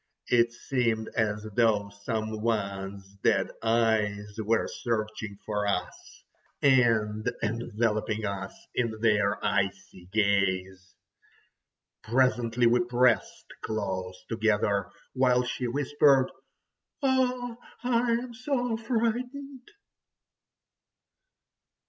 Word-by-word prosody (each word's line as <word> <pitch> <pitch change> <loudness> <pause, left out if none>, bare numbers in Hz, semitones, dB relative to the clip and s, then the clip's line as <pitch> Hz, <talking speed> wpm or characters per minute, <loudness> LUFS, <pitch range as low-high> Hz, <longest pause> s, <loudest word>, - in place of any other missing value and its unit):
It 120 -1 +4
seemed 120 -3 -1
as 105 -2 0
though 105 -4 +3 0.2
some 110 -2 -2
one's 100 -3 -2 0.2
dead - - +2
eyes 110 -3 +1
were 110 +1 +1
searching 110 -3 -3
for 105 -1 -1
us, 90 -3 -4 0.4
and 115 -6 +3
enveloping 110 -1 -1
us 100 -1 -3 0.2
in 115 -3 -1
their 105 -2 +3
icy 95 -2 -2
gaze. 95 -2 0 1.1
Presently 120 0 +2
we 120 +1 +5
pressed 120 -1 +1
close 95 -4 -4
together, 105 -3 +1 0.2
while 125 -1 +3
she 125 0 -3
whispered: 140 0 +3 0.7
"Oh! 250 -3 +1 0.3
I 240 -1 +2
am 240 +1 -2
so 245 -1 -1
frightened!" 250 +4 -2
115 Hz, 90 wpm, -28 LUFS, 105-130 Hz, 1.1 s, we